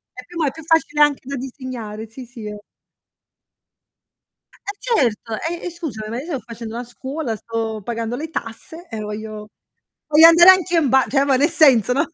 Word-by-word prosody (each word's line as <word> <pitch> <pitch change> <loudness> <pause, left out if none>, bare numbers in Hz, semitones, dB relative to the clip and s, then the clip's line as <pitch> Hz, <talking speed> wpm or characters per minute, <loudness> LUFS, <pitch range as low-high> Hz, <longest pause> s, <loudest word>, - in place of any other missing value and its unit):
E 255 0 -10
più 350 -1 -10
ma 320 - +1
è - - 0
più 320 - -12
facile 320 -2 +1
anche 295 -2 +4
da 275 +2 -5
disegnare. 245 -5 -7
Sì, 250 +4 -11
sì, 235 -2 -10
è 210 - -5 2.2
Eh 405 - -9
certo, 240 - 0
e 345 +1 -5
e - - -3
scusami, 305 -11 -6
ma 230 - -4
io - - -8
sto 320 -6 -3
facendo 230 0 -9
una 240 +1 -4
scuola, 260 +1 -5
sto 225 0 -4
pagando 230 +1 -3
le 315 +4 -6
tasse 320 +6 -7
e 225 -2 -6
voglio 210 0 -7 0.6
voglio 310 +2 +8
andare 340 +2 +8
anche 365 -2 +1
in 315 -4 +3
ba 265 0 +4
cioè 275 0 +2
ma 275 -2 +3
nel 285 +5 +3
senso, 255 - +4
no, 275 - +1
255 Hz, 195 wpm, -20 LUFS, 225-315 Hz, 2.2 s, voglio